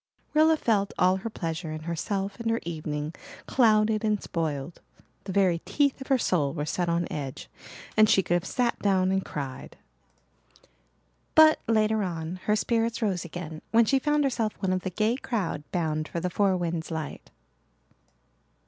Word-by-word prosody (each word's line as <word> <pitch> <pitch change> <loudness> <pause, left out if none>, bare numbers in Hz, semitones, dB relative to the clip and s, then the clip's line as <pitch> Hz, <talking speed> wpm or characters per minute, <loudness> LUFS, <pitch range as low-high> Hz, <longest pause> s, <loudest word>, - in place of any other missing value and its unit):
Rilla 315 +1 +5
felt 210 -7 +1
all 185 +1 +4
her 210 +4 -5
pleasure 165 -4 -4
in 155 0 -5
herself 195 +5 -3
and 230 -1 -2
her 230 0 +1
evening 155 -2 -4 0.3
clouded 215 -3 +3
and 210 -1 +1
spoiled. 160 -3 -4 0.4
The 195 - -4
very 185 -3 +3
teeth 280 - 0
of 265 - -7
her 270 - +4
soul 150 - +1
were 150 -2 -2
set 175 +3 -1
on 170 0 0
edge 140 -3 -5 0.5
and 215 -1 +6
she 195 -3 +4
could 175 - -1
have 175 -1 +2
sat 245 -2 0
down 190 -2 +2
and 190 0 +1
cried. 135 -3 -6 1.6
But 315 0 +7
later 220 -1 +2
on 170 -2 -3
her 210 - +4
spirits 230 +2 0
rose 190 -5 0
again 165 -2 -7
when 230 0 +5
she 270 +3 +3
found 295 +2 +1
herself 235 -6 0
one 190 -2 0
of 185 - -1
the 185 - -3
gay 215 +6 0
crowd 200 - -3
bound 155 -3 -1
for 170 - -4
the 180 +1 -2
Four 195 0 +2
Winds 170 -2 -3
light. 160 -3 -5
190 Hz, 170 wpm, -27 LUFS, 165-220 Hz, 1.6 s, But